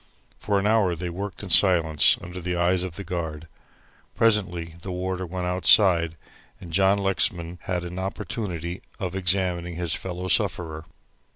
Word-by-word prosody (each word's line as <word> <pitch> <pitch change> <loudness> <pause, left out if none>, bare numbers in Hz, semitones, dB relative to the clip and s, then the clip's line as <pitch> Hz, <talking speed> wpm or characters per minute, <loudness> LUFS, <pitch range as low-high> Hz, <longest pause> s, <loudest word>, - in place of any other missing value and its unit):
For 100 -1 0
an 100 - 0
hour 105 -5 +3
they 90 +1 -4
worked 95 +1 -6
in 95 - -3
silence 85 -5 +4
under 90 +1 -7
the 90 +1 -2
eyes 90 +1 +2
of 90 -3 -5
the 100 - -6
guard. 80 -4 -5 0.7
Presently 90 -7 +1
the 95 - -7
warder 90 0 -3
went 90 +1 -4
outside, 90 -2 +4 0.4
and 85 -5 -10
John 95 +2 +4
Lexman 90 -3 0
had 90 -2 -2
an 90 +1 -6
opportunity 95 -3 -4 0.2
of 95 -4 -4
examining 90 -2 0
his 85 -2 -2
fellow 95 0 -4
sufferer. 80 -3 0
90 Hz, 155 wpm, -25 LUFS, 85-95 Hz, 0.7 s, silence